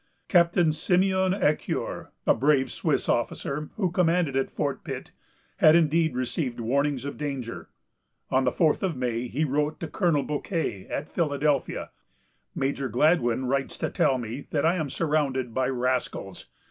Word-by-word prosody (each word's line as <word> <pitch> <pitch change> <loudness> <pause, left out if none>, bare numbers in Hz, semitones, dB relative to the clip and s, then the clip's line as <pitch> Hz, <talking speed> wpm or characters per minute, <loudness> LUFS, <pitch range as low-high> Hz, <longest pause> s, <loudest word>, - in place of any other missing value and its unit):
Captain 170 -2 +4
Simeon 190 +3 +2
Ecuyer, 180 -6 -1 0.2
a - - +5
brave 135 -2 +2
Swiss - - -1
officer, 150 +2 -1
who 190 -5 0
commanded 170 -5 +2
at 135 - +1
Fort - - -3
Pitt, - - -6 0.5
had 155 +1 +6
indeed 160 -2 +3
received 125 0 -2
warnings 140 +3 0
of 140 - -5
danger. 135 -5 -5 0.6
On 130 +1 +3
the 125 - +2
fourth 155 +2 +2
of 185 -5 -1
May, 125 -1 -2
he 145 +6 -1
wrote 150 +2 -1
to 165 - -4
Colonel 160 -4 +1
Bouquet 150 - -3
at 150 - -4
Philadelphia: 145 -4 -1 0.6
"Major 135 0 -1
Gladwyn 125 -1 +2
writes 135 +1 -1
to - - -2
tell 130 - +2
me 120 +3 -6
that 145 -1 0
I 165 - +4
am 155 -4 -2
surrounded 135 -5 0
by 130 +1 +1
rascals. 125 -7 -2
145 Hz, 150 wpm, -26 LUFS, 130-165 Hz, 0.6 s, had